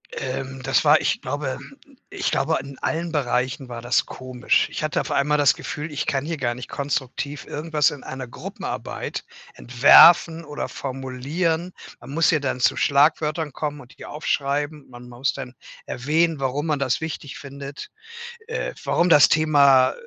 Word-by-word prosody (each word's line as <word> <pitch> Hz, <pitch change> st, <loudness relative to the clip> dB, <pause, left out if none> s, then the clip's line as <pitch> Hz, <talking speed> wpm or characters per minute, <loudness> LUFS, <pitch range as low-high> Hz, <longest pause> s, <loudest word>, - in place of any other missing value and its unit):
Ähm, 135 Hz, 0 st, -5 dB
das -, -, +2 dB
war, -, -, +6 dB
ich -, -, -1 dB
glaube 145 Hz, -3 st, -3 dB, 0.5 s
ich -, -, -2 dB
glaube, 155 Hz, +4 st, +1 dB
in 135 Hz, 0 st, -11 dB
allen 165 Hz, +1 st, -2 dB
Bereichen 130 Hz, -2 st, -1 dB
war 120 Hz, -1 st, -6 dB
das 120 Hz, +1 st, +1 dB
komisch. 130 Hz, -1 st, 0 dB
Ich -, -, -5 dB
hatte 155 Hz, -2 st, 0 dB
auf -, -, -4 dB
einmal 150 Hz, +2 st, +2 dB
das 145 Hz, -2 st, +5 dB
Gefühl, 150 Hz, +2 st, -6 dB
ich 145 Hz, -, -2 dB
kann 135 Hz, 0 st, -1 dB
hier 165 Hz, +1 st, -2 dB
gar 125 Hz, -5 st, -1 dB
nicht 125 Hz, -, -8 dB
konstruktiv 140 Hz, 0 st, -4 dB
irgendwas 150 Hz, -1 st, 0 dB
in 145 Hz, -, -9 dB
einer 130 Hz, -1 st, -7 dB
Gruppenarbeit -, -, -6 dB, 0.3 s
entwerfen 165 Hz, +6 st, +6 dB
oder 150 Hz, -1 st, -5 dB
formulieren. 140 Hz, +7 st, -3 dB, 0.3 s
Man -, -, -12 dB
muss 160 Hz, +4 st, +2 dB
ja 155 Hz, -, +3 dB
dann 130 Hz, -2 st, -2 dB
zu 125 Hz, -, +3 dB
Schlagwörtern 150 Hz, +1 st, +2 dB
kommen 150 Hz, 0 st, -4 dB
und 125 Hz, -1 st, -16 dB
die -, -, -18 dB
ja -, -, -8 dB
aufschreiben. 145 Hz, 0 st, -2 dB
Man 125 Hz, 0 st, -12 dB
muss 125 Hz, +2 st, -1 dB
dann 125 Hz, +1 st, -8 dB, 0.3 s
erwähnen, 160 Hz, +4 st, 0 dB
warum 135 Hz, +3 st, -1 dB
man 150 Hz, -3 st, 0 dB
das 130 Hz, -3 st, 0 dB
wichtig 155 Hz, -3 st, -6 dB
findet. 140 Hz, 0 st, -9 dB, 0.6 s
Äh, 465 Hz, -, -3 dB
warum 175 Hz, -, +2 dB
das 150 Hz, -3 st, +7 dB
Thema 140 Hz, -4 st, +5 dB
äh, -, -, -9 dB
140 Hz, 170 wpm, -23 LUFS, 130-155 Hz, 0.6 s, das